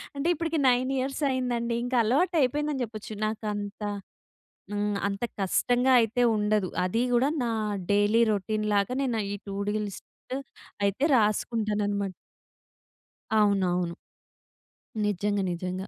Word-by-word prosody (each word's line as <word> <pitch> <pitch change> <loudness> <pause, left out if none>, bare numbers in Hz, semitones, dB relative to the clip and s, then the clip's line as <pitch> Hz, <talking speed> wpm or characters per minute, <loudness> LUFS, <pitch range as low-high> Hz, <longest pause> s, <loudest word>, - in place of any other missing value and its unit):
అంటే, 280 +3 -1
ఇప్పటికి 330 -1 -1
9 255 +1 +2
ఇయర్స్ 270 +3 -3
అయిందండి. 240 -2 -1
ఇంక 245 +1 -4
అలవాటు 315 +11 +2
అయిపోయిందని 290 +1 0
చెప్పొచ్చు. 215 -1 -8
నాకంత 210 -1 -4 0.9
ఆహ్, 205 0 0
అంత 200 +3 -4 0.2
కష్టంగా 245 +6 +2
అయితే 230 +2 0
ఉండదు. 210 -2 +1 0.2
అది 185 +6 0
గూడా 250 +4 +3
నా 235 - 0 0.4
డైలీ 205 +3 +4
రొటీన్ 215 +1 -1
లాగా 200 +5 +2
నేను 240 -5 0
ఈ - - -2
టూ 195 - -4
డు - - +1 0.2
లిస్ట్ 195 - -10 0.8
అయితే 200 +7 0
రాసుకుంటాననమాట. 210 -2 0 1.3
అవునవును. 180 -4 +2 1.1
నిజంగా, 205 0 0
నిజంగా. 185 +2 -4
215 Hz, 115 wpm, -27 LUFS, 200-245 Hz, 1.3 s, డైలీ